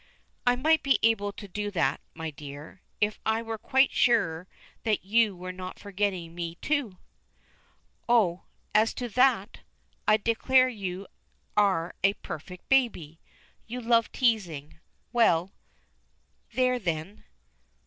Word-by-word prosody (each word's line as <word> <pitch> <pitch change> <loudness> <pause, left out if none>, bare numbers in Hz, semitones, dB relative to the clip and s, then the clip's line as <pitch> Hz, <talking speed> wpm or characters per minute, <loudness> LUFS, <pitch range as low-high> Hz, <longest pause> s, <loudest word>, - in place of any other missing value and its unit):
"I 245 - +5
might 315 +5 +3
be 275 - +3
able 220 -3 +2
to 205 - -9
do 205 +2 -3
that, 195 -4 0
my 160 -1 -5
dear, 145 +4 -10 0.2
if 210 0 0
I 220 +1 0
were 225 -1 -5
quite 265 +5 +3
sure 170 -8 +2 0.3
that 215 -4 0
you 215 0 +3
were 180 +1 -6
not 185 0 -8
forgetting 195 -4 -2
me, 170 -1 -5
too." 260 - -2 1.1
"Oh, 195 -7 +3 0.3
as 215 +2 +3
to 245 - -3
that! 240 -3 +2 0.5
I 215 - +6
declare 255 +4 +3
you 195 -4 -5 0.5
are 190 -5 +2
a 195 0 +5
perfect 180 +1 -9
baby! 200 - +1 0.5
You 245 +3 -5
love 230 -2 +2
teasing. 180 - -1 0.3
Well 190 -6 +3 1.0
there 255 0 +2
then!" 170 0 -4
205 Hz, 130 wpm, -28 LUFS, 180-235 Hz, 1.1 s, I